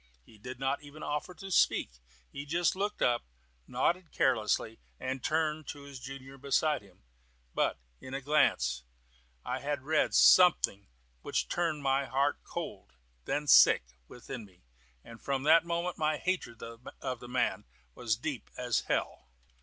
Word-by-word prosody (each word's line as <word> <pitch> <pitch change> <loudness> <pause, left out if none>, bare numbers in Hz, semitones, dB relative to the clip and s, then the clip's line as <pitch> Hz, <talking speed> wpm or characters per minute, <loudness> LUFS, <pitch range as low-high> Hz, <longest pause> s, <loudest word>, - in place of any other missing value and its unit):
He 110 - -18
did 125 +3 -8
not 135 +1 -1
even 150 +1 -11
offer 150 +5 -3
to 195 +4 -9
speak. - - +2 0.3
He 140 - -6
just 170 +4 +1
looked 205 +2 -2
up, 120 -1 +3 0.5
nodded 175 -1 0
carelessly, 110 -2 +1 0.2
and 130 0 -4
turned 155 -1 0
to 145 - -7
his 140 -2 -10
junior 135 +1 -9
beside 140 +2 +1
him; 95 -9 -21 0.5
but - - +1 0.2
in 130 - -10
that 135 0 -4
glance 65 - +2 0.6
I 125 +1 -2
had 145 -1 -3
read 155 +2 +1
something 165 - +6 0.3
which - - -1
turned 165 -4 -1
my 135 0 +2
heart 135 +3 0
cold, - - -7 0.3
then 150 - -1
sick, 145 - +7 0.2
within 125 -1 -8
me, 95 -7 -19 0.4
and 115 -1 -13
from 135 -1 -1
that 160 +2 +6
moment 170 +1 -2
my 155 -1 +1
hatred 170 -11 -3
of 115 +2 -7
the 125 - -10
man 125 0 0 0.3
was 115 - -1
as - - -17
deep 140 -1 -4
as 125 -2 +1
hell. - - -2
135 Hz, 155 wpm, -31 LUFS, 125-155 Hz, 0.6 s, sick